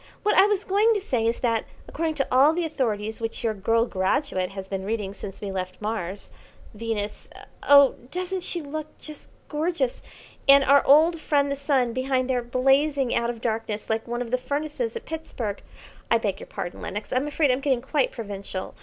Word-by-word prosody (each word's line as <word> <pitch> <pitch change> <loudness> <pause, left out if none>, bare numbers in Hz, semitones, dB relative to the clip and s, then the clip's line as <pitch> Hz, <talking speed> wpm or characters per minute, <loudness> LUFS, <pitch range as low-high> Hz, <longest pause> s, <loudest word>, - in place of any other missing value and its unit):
What 420 - +2
I 390 - +7
was 415 -2 0
going 425 +4 +3
to - - +1
say 245 - 0
is 230 - -1
that, 230 -3 +1 0.2
according 320 0 -2
to 275 -2 0
all 270 +5 +6
the 345 0 -1
authorities 220 -8 -2
which 225 0 -4
your 225 -2 +1
girl 225 +3 +1
graduate 190 -1 0
has 195 -1 -7
been 190 -1 -4
reading 205 -1 -3
since 195 -1 -8
we 200 -2 -4
left 185 -1 -4
Mars, 205 -3 -4 0.4
Venus 210 -1 -4 0.4
oh, 280 -1 +8 0.2
doesn't 365 +3 -3
she 345 -2 -3
look 305 +1 -5
just 305 -1 -10 0.2
gorgeous, 300 -4 -1 0.5
and 280 0 +8
our 280 +1 +5
old 320 +4 +6
friend 285 -2 +1
the - - 0
Sun 270 -4 +1
behind 255 0 0
there 255 -2 +1
blazing 270 +2 +2
out 235 0 +1
of 235 -2 -5
darkness 220 -2 -2
like 220 +1 -1
one 240 +1 -2
of 235 - -10
the 255 - +1
furnaces 305 - -3
at 465 - -6
Pittsburg 250 -10 -5 0.5
I 230 - +5
beg 205 -4 -2
your - - -10
pardon, 175 - -6
Lenox, 210 +2 -5
I'm 260 +3 +1
afraid 295 -1 +2
I'm 255 +2 0
getting 265 -4 +1
quite 270 0 +1
provincial. 200 -4 -6
255 Hz, 195 wpm, -25 LUFS, 220-295 Hz, 0.5 s, oh